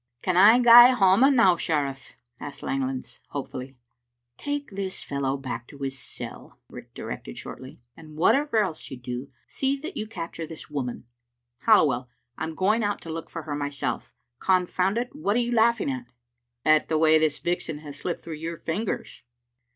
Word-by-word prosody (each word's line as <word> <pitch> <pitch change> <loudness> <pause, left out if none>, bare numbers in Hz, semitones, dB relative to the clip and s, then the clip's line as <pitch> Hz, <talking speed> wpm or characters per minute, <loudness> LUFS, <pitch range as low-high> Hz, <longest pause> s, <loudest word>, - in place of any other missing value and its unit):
"Can 185 - 0
I 205 +6 +8
gae 240 +1 +9
hame 225 +7 +5
now, 190 -7 +6
sheriff?" 140 -5 -2 0.2
asked 145 - -8
Langlands^ 135 -1 -3
hopefully. 130 -1 -6 0.6
"Take 290 - -4
this 195 -1 -4
fellow 140 -1 -2
back 125 -3 -6
to 145 - -13
his 135 -1 -4
cell," - - -9
Riach - - -11
directed - - -7
shortly, 130 0 -9
" 120 - -54
and 155 -1 -13
whatever 270 - +3
else 165 -5 -5
you 135 - -7
do, 125 +2 -6 0.2
see 270 +1 -1
that 310 +7 -7
you 215 - -4
cap 170 -6 -6
ture 165 -1 -6
this 160 -1 -10
woman. 130 -4 -4 0.6
Halliwell, 140 - +4 0.3
I - - -3
am 160 0 -6
going 215 +6 +2
out 205 0 -1
to 165 - -6
look 165 0 -6
for 165 - -6
her 150 -1 -5
myself. 145 -4 -3 0.3
Confound 185 +2 +1
it, 245 +3 -3
what 215 -9 0
are - - +3
you 240 0 0
laughing 235 +4 +3
at?" 255 -2 -6 0.6
"At 155 0 +4
the 160 - +2
way 160 0 +5
this 155 -2 +1
vixen 175 -3 -2
has 145 -2 -9
slipped 175 - -3
through 160 -2 -6
your 165 +2 -5
fingers." 195 +7 -4
165 Hz, 180 wpm, -26 LUFS, 140-220 Hz, 0.6 s, gae